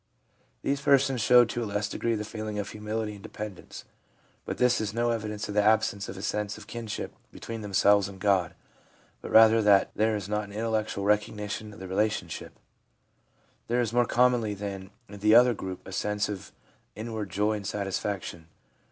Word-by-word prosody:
These 140 0 0
persons 135 -3 +3
show 120 +2 +7
to 120 +1 -3
a - - -3
less 105 0 -1
degree 115 +2 -1
the 105 0 -4
feeling 110 -1 -5
of 105 -1 -2
humility 105 0 -3
and 100 - -12
dependence; 105 -1 -8 0.6
but - - -4
this 125 -1 +3
is 105 0 -3
no 120 0 +1
evidence 105 -1 -3
of 105 - -5
the 105 - +4
absence 105 -1 +2
of 95 - -7
a 95 - -7
sense 105 -1 -2
of - - -11
kinship 115 -3 -5 0.2
between 115 -1 -7
themselves 100 0 +3
and 95 -1 -11
God, 95 -4 +1 0.7
but - - -7
rather 110 0 +7
that 100 -2 +4
there 110 +1 +2
is 100 -3 -4
not 105 0 -1
an 100 - -12
intellectual 110 -2 -1
recognition 105 +1 -1
of 105 - -13
the 95 - -7
relation 105 +3 0
ship. - - -7 1.1
There 120 +1 +1
is 115 -2 0
more 120 -1 +3
commonly 120 -4 +2
than 100 -1 -6 0.2
in 100 0 -10
the 105 +2 +5
other 120 +1 +7
group 95 -3 -7
a - - -8
sense 105 +2 -1
of 100 -3 -6 0.4
inward 110 -1 -5
joy 105 +4 +1
and 105 -2 -4
satisfaction. 95 -4 -3
105 Hz, 185 wpm, -28 LUFS, 100-110 Hz, 1.1 s, show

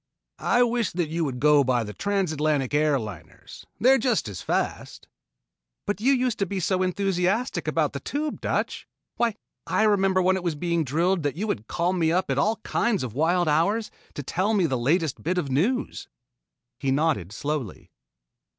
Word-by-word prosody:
"I 245 - +5
wish 235 -3 0
that 170 -3 -1
you 165 +1 -1
would 130 -3 -4
go 150 0 +5
by 125 -2 +1
the 105 -1 -7
Trans 195 - -1
Atlantic 150 -3 0
Air 150 -1 +3
Liners. 90 -8 -10
They 245 +6 +5
are 270 - +6
just 230 - +1
as 100 -4 -6
fast." - - -3 0.8
"But 205 0 -2
you 260 +4 +4
used 250 -3 +1
to 200 - 0
be 195 +1 -3
so 185 +2 0
enthusiastic 190 +5 0
about - - +1
the - - -4
Tube, 300 +1 -3
Dutch! - - -2 0.3
Why 235 -3 +1 0.3
I - - +2
remember 195 -3 +3
when 185 +1 +3
it 185 - -6
was 170 -3 -1
being 170 +1 0
drilled 170 +6 +1
that 145 -1 -2
you 200 +6 -2
would 110 - -3
call 175 +2 0
me 165 -3 +1
up 180 -4 0
at 135 - +1
all 215 +10 +2
kinds 230 - 0
of 120 -4 -5
wild 170 +5 +2
hours 200 +9 +1 0.2
to 145 - -5
tell 190 +10 0
me 190 -4 +3
the 135 -5 0
latest 150 +5 0
bits 180 +3 0
of 140 -6 -3
news." 210 - 0 0.7
He 135 - -1
nodded 135 - +1
slowly. 140 -2 -4
175 Hz, 190 wpm, -25 LUFS, 145-200 Hz, 0.8 s, are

